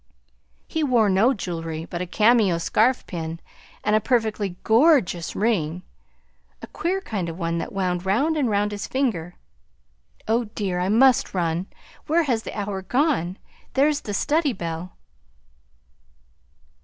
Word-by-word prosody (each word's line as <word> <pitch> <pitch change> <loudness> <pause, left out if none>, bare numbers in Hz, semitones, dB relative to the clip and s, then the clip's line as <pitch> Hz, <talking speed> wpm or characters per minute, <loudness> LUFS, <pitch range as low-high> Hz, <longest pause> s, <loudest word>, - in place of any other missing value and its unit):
"He 320 -2 -2
wore 235 -7 +3
no 205 +7 +4
jewelry 165 -7 -4
but 175 0 -5
a 180 - -3
cameo 215 -2 +3
scarf 225 +9 +1
pin 165 -1 -5 0.4
and 210 +1 +2
a - - +5
perfectly 215 -5 0
gorgeous 225 - +3
ring, 180 -6 0 0.8
a - - -8
queer 375 +3 -2
kind 195 - -3
of 165 - -7
one 170 -1 -1
that - - -5
wound 180 -2 -1
round 240 +12 +1
and 280 -6 +1
round 205 0 +1
his 205 0 -5
finger. 205 -11 -1 0.9
Oh 230 +2 +1
dear, 200 -4 -3
I 180 +1 0
must 245 0 +4
run! 170 +1 -1 0.4
Where 330 +3 +3
has 245 -7 0
the 220 - -6
hour 200 -1 -3
gone? 205 - 0 0.4
There's 290 +2 +3
the 205 - -4
study 300 +1 +1
bell!" 170 -1 -5
205 Hz, 145 wpm, -23 LUFS, 180-245 Hz, 0.9 s, a